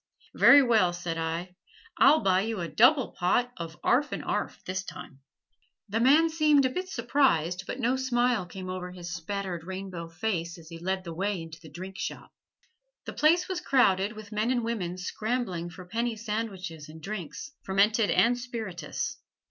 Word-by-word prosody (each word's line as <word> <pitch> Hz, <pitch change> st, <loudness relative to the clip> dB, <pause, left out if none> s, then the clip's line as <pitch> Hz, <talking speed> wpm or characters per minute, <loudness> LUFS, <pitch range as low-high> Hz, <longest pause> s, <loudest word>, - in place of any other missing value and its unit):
"Very 285 Hz, -1 st, +8 dB
well," 220 Hz, -8 st, +3 dB
said 175 Hz, -2 st, -4 dB
I; 165 Hz, +3 st, -3 dB, 0.4 s
"I'll 280 Hz, +7 st, +6 dB
buy 185 Hz, -1 st, +3 dB
you 220 Hz, 0 st, -2 dB
a 170 Hz, -, -2 dB
double 255 Hz, -, +4 dB
pot 245 Hz, +8 st, +1 dB
of 165 Hz, -2 st, -7 dB
'arf 285 Hz, +4 st, +2 dB
and -, -, -4 dB
'arf, -, -, -2 dB
this 185 Hz, +1 st, -3 dB
time." 140 Hz, -7 st, -10 dB, 0.7 s
The 220 Hz, +3 st, 0 dB
man 290 Hz, +7 st, +6 dB
seemed 300 Hz, -3 st, +4 dB
a 260 Hz, -, +1 dB
bit 365 Hz, +6 st, -4 dB
surprised, 225 Hz, -, +1 dB
but 250 Hz, -, -4 dB
no 250 Hz, +1 st, +2 dB
smile 245 Hz, -6 st, +1 dB
came 185 Hz, +1 st, -8 dB
over 185 Hz, 0 st, -4 dB
his 175 Hz, -1 st, -7 dB
spattered 180 Hz, 0 st, -4 dB
rainbow 185 Hz, -2 st, -6 dB
face 170 Hz, -2 st, -3 dB
as 165 Hz, -1 st, -13 dB
he 165 Hz, -1 st, -9 dB
led 190 Hz, +2 st, -2 dB
the 170 Hz, -2 st, -6 dB
way 195 Hz, +2 st, -1 dB
into 165 Hz, 0 st, -9 dB
the 160 Hz, -, -12 dB
drink 185 Hz, +5 st, -8 dB
shop. -, -, -6 dB, 0.7 s
The -, -, -6 dB
place 335 Hz, +4 st, +3 dB
was 370 Hz, -2 st, -3 dB
crowded 205 Hz, -, +3 dB
with 215 Hz, -1 st, -11 dB
men 215 Hz, +2 st, 0 dB
and 245 Hz, -2 st, +1 dB
women 190 Hz, -6 st, -3 dB
scrambling 185 Hz, -2 st, -3 dB
for 180 Hz, +1 st, -11 dB
penny 230 Hz, +5 st, -2 dB
sandwiches 195 Hz, -8 st, -5 dB
and 160 Hz, +1 st, -11 dB
drinks 200 Hz, -, -6 dB
fermented 205 Hz, +3 st, +2 dB
and 245 Hz, +1 st, +3 dB
spirituous. 220 Hz, -, -4 dB
195 Hz, 175 wpm, -28 LUFS, 175-240 Hz, 0.7 s, Very